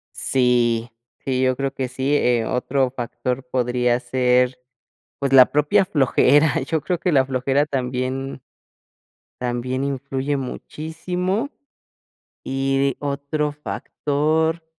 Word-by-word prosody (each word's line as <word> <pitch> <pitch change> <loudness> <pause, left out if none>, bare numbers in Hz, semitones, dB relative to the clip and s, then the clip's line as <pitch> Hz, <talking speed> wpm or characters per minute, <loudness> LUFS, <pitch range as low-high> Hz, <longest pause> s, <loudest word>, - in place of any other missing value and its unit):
Sí 120 -2 +1 0.3
sí, 130 -1 0
yo 130 0 +2
creo 135 +1 -2
que 130 -2 -3
sí, 135 +3 -1
eh, 120 -5 +2
otro 130 +1 0
factor 125 +1 -3
podría 125 -1 +1
ser, 125 0 +2 0.6
pues 140 -2 -1
la 130 -2 +8
propia 150 +5 +3
flojera, 145 -3 +3
yo 150 +4 -1
creo 175 +5 -1
que 180 - 0
la 135 -3 +4
flojera 135 +2 +1
también 130 0 -3 1.0
también 125 +2 -2
influye 140 +1 -2
muchísimo, 180 - -3 0.9
y 135 0 0
otro 145 +1 -2
factor 155 +2 -1
135 Hz, 110 wpm, -22 LUFS, 125-145 Hz, 1.0 s, la